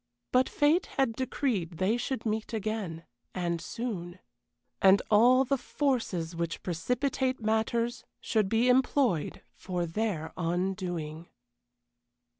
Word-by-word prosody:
But 255 +1 +3
fate 305 +5 +2
had 270 -4 +2
decreed 225 - -1
they 190 +6 +2
should 260 +1 -3
meet 220 +1 -2
again, 210 -6 -3 0.3
and 170 -2 -1
soon; 190 -7 -5 0.6
and 195 0 +7
all 250 +5 +6
the 275 +1 0
forces 225 - -1
which 170 0 -3
precipitate 255 - -1
matters 225 +2 0 0.2
should 215 -4 0
be 230 +3 +3
employed 250 - +2
for 180 -2 -3
their 170 -2 -2
undoing. 175 -2 -2
215 Hz, 110 wpm, -29 LUFS, 175-250 Hz, 0.6 s, and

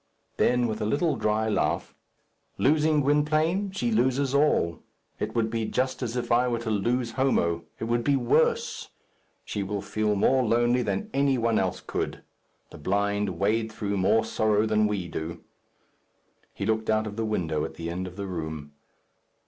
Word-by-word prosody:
Then, 125 0 +3
with 110 -2 -3
a - - 0
little 150 +7 +1
dry 110 +1 0
laugh, 105 - 0 0.6
"Losing 150 +1 +3
Gwynplaine, 155 +7 +2
she 125 -11 -2
loses 130 +4 +1
all. 140 - +2 0.4
It 110 +2 -3
would 110 -1 +1
be 115 -1 -1
just 130 +4 -1
as 125 -1 -3
if 125 - -3
I 120 +2 +4
were 120 -1 0
to 115 -1 -3
lose 120 +4 0
Homo. 85 -10 +1
It - - -6
will 120 +1 +1
be 140 +3 +2
worse. 470 - +1 0.6
She 105 - -3
will 100 0 -3
feel 105 +1 0
more 130 +6 +3
lonely 120 +1 +2
than 210 - -2
any 140 -1 +2
one 115 -2 +2
else 95 -1 -1
could. - - -3 0.5
The - - -11
blind 100 +2 0
wade 110 +4 +1
through 100 -2 -3
more 95 +4 +3
sorrow 110 -1 +1
than 110 -1 +2
we 100 -4 -2
do." 80 0 -6 1.1
He - - -5
looked 110 +1 0
out 110 0 +2
of 105 -1 -6
the 115 - -2
window 80 -8 -1
at - - -5
the 85 0 -5
end 90 +2 -4
of 90 - -10
the 100 0 -5
room. 80 -5 -5
110 Hz, 175 wpm, -26 LUFS, 100-130 Hz, 1.1 s, I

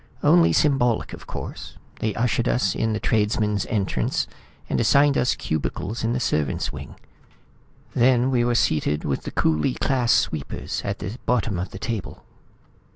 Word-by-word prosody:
"Only 85 -1 +5
symbolic, 125 - +2
of - - -10
course. - - -7 0.2
They 110 -1 -1
ushered 120 0 0
us 95 -7 +1
in 110 -1 0
the 110 - -1
tradesman's 105 -2 0
entrance, 105 -5 0 0.4
and - - -1
assigned 140 +5 +4
us 125 - +2
cubicles 90 +8 -3
in 115 +1 +1
the 125 - 0
servants' 75 - -1
wing. - - -8 1.0
Then 125 +1 +3
we 120 -2 +2
were 120 0 +1
seated 75 -7 +1
with 70 - -2
the - - -4
coolie 80 - +1
class 125 -3 +1
sweepers 75 -3 -1
at 100 0 -2
the 105 - -5
bottom 110 -6 +1
of 90 - -3
the - - -9
table." 115 -5 -5
110 Hz, 160 wpm, -23 LUFS, 95-120 Hz, 1.0 s, Only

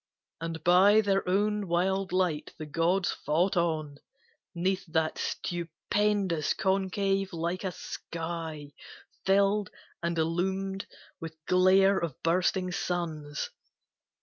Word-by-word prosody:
And 165 -1 -5
by 195 +5 +6
their 195 -3 +1
own 205 +1 +1
wild 190 +2 0
light 180 -5 0
the 155 - -6
gods 170 +5 +1
fought 175 +6 0
on 155 -4 -1 0.6
'Neath 185 +3 0
that 160 0 0
stupendous 175 0 -1
concave 195 0 0
like 170 +2 -3
a 190 - -1
sky 165 -3 -6 0.5
Filled 200 +1 +3 0.3
and 170 0 -1
illumed 190 +4 -1 0.3
with 160 -1 -7
glare 190 +2 +5
of 165 -6 -3
bursting 180 +2 +1
suns. 160 -5 -3
180 Hz, 105 wpm, -29 LUFS, 165-195 Hz, 0.6 s, by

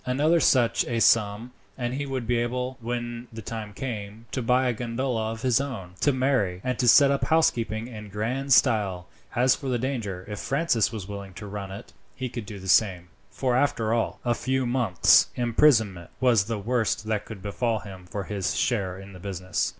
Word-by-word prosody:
Another 150 +7 +2
such 125 -6 +3
a 115 -1 -1
sum, 110 +1 +3 0.3
and 120 -1 -2
he 140 +2 -3
would 130 -3 -3
be 120 +1 +1
able, 125 +2 -2
when 120 0 -4
the 110 -1 -8
time 110 -1 -6
came, 110 -2 -6
to 130 - -2
buy 125 +2 +2
a 125 - +1
gondola 115 -1 -2
of 115 0 -7
his 125 0 +3
own, 110 -11 -6
to 145 - +4
marry, 130 -9 +1
and 125 0 -1
set 140 +2 +7
up 140 - 0
housekeeping 115 -8 +1
in 105 -4 -9
grand 120 +7 -3
style. 105 -8 +3 0.3
As 125 +2 +4
for 135 -4 -5
the 125 - +1
danger, 115 -8 -3
if 105 -1 -6
Francis 135 - +1
was 105 -5 -6
willing 100 -2 -8
to 105 - -8
run 100 -1 -6
it 100 +4 -10 0.2
he 130 -1 -4
could 115 -3 -6
do 105 - -7
the 95 0 -9
same; 90 -3 +3 0.2
for 125 -2 -1
after 115 -5 +1
all, 115 -1 -1
a 120 - +3
few 130 +2 -1
months' 120 -8 +4
imprisonment 110 - +2
was 120 -6 +4
the 115 0 -3
worst 110 +1 0
that 110 -1 -1
could 105 -4 -9
befall 110 +2 -1
him 95 -3 -11
for 100 +2 -4
his 95 -1 -2
share 95 -7 0
in 95 0 -11
the 90 - -11
business. 95 -1 -2
115 Hz, 195 wpm, -26 LUFS, 100-125 Hz, 0.3 s, set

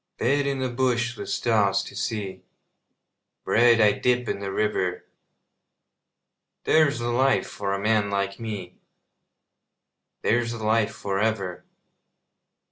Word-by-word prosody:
Bed 140 +1 +1
in 140 -1 -1
the 130 -1 -2
bush 120 -1 0
with - - -7
stars 105 -4 +2
to - - -10
see, 100 -4 -4 1.0
Bread 120 0 +4
I 105 -2 +6
dip 125 +1 0
in - - -2
the 100 -1 -4
river 95 -3 -1 1.6
There's 155 -2 +3
the 120 0 -2
life 135 +3 +2
for 100 -1 -3
a - - -4
man 105 0 +1
like 100 0 -2
me, 100 -6 -6 1.4
There's 120 +1 +1
the 115 -2 -7
life 110 0 +2
for 95 -1 -3
ever. 100 -5 -2
110 Hz, 125 wpm, -25 LUFS, 100-120 Hz, 1.6 s, I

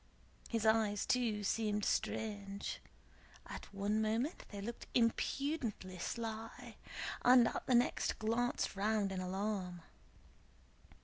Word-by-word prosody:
His 225 -2 0
eyes 220 -2 +3
too 225 -5 +1
seemed 210 0 +1
strange; 200 -2 -2 0.6
at - - -8
one 205 +2 0
moment 225 +9 0
they 205 - -6
looked 230 +4 -6
impudently 230 - 0
sly 225 +3 -5 0.5
and 245 -1 +8
at - - -5
the 255 - +5
next 240 - +2
glanced 230 +1 0
round 205 0 +1
in 185 -1 -2
alarm. 185 -2 -2
220 Hz, 110 wpm, -36 LUFS, 200-235 Hz, 0.6 s, and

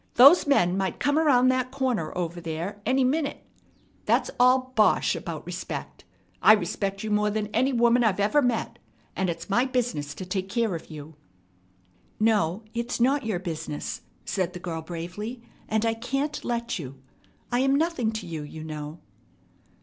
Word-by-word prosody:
Those 280 +6 +8
men 180 -11 +3
might 190 -1 -2
come 290 +2 +2
around 255 -5 +4
that 255 -1 +1
corner 255 - -1
ever 175 -1 -3
there 170 +5 -5
any 260 +2 +3
minute. 285 +3 -1 0.6
That's - - +2
all 255 +1 +4
bosh 215 -1 +3
about - - -6
respect. - - -6 0.4
I 215 - +8
respect 195 0 -1
you 215 - -3
more 210 0 +2
than 210 0 -2
any 260 +5 +1
woman 240 0 +4
I 220 - +5
ever 210 +9 +3
met. 245 -4 -1 0.4
And 190 -1 0
it's 170 0 -5
my 215 +5 +3
business 245 - -2
to 185 - -6
take 190 +1 -3
care 230 -2 0
of 165 - -7
you." 150 -1 -10 1.0
"No, 210 -3 +2
it's 235 +1 -3
not 265 0 +2
your 210 -5 0
business," 165 -4 -5 0.2
said 185 -2 -1
the 180 - -7
girl 165 -2 -4
bravely, 180 +9 -6 0.3
"and 220 +1 +1
I 225 - +2
can't 275 +6 -3
let 235 -3 -2
you. 135 -4 -7 0.6
I'm 265 +3 +3
nothing 290 -7 +1
to 220 -3 -5
you, 165 -3 -5
you 155 +1 -8
know." 155 0 -6
215 Hz, 165 wpm, -26 LUFS, 175-255 Hz, 1.0 s, Those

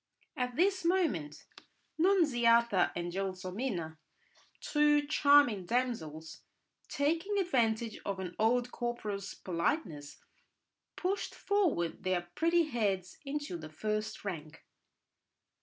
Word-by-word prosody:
At 250 -1 -2
this 375 +3 +2
moment, 315 - 0 0.5
Nunziata 240 - +4
and 175 0 -3
Gelsomina, 185 -2 -4 0.6
two 295 -1 +3
charming 285 - +4
damsels, 160 -11 -2 0.5
taking 330 +8 0
advantage 235 - +1
of 200 -1 -3
an 180 -2 -5
old 240 +3 +2
corporal's 210 -5 -4
politeness, 170 - -2 0.8
pushed 380 +3 -2
forward 345 - 0
their 175 -2 -1
pretty 335 - +3
heads 200 - -2
into 290 -9 -3
the 155 -1 -9
first 215 +7 -3
rank. 160 -4 -6
230 Hz, 95 wpm, -32 LUFS, 180-295 Hz, 0.8 s, Nunziata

